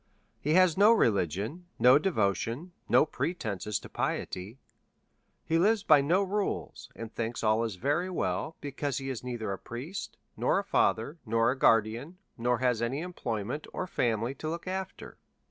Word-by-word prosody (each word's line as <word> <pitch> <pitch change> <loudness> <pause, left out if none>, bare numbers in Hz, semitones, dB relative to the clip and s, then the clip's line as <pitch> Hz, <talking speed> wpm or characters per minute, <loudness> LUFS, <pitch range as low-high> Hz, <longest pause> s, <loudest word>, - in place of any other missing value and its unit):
He 150 +3 +1
has 185 -3 +5
no 210 +3 +8
religion, 110 - 0
no 125 +3 +7
devotion, 130 - -1 0.2
no - - +6
pretences 105 - -3
to - - -10
piety. 95 +7 -3 0.9
He 165 +1 +2
lives 210 +3 +3
by 150 -7 +6
no 175 +8 +2
rules, 195 - -3
and 115 -1 -8
thinks 115 +1 -3
all 110 +1 +3
is 110 -4 -3
very 145 - 0
well, 165 -2 -2
because 140 -1 -3
he 135 -1 -3
is 125 - -6
neither 120 -5 -4
a 95 - -6
priest, 140 +12 -7 0.2
nor - - +2
a - - 0
father, 140 +9 +1
nor 115 0 +2
a - - -2
guardian, 115 - +2 0.2
nor 120 +1 +1
has 125 -2 +1
any 130 +5 -1
employment 125 - -4
or - - -2
family 120 - 0
to 155 +3 -5
look 170 +1 -5
after. 190 0 -5
130 Hz, 165 wpm, -29 LUFS, 115-170 Hz, 0.9 s, no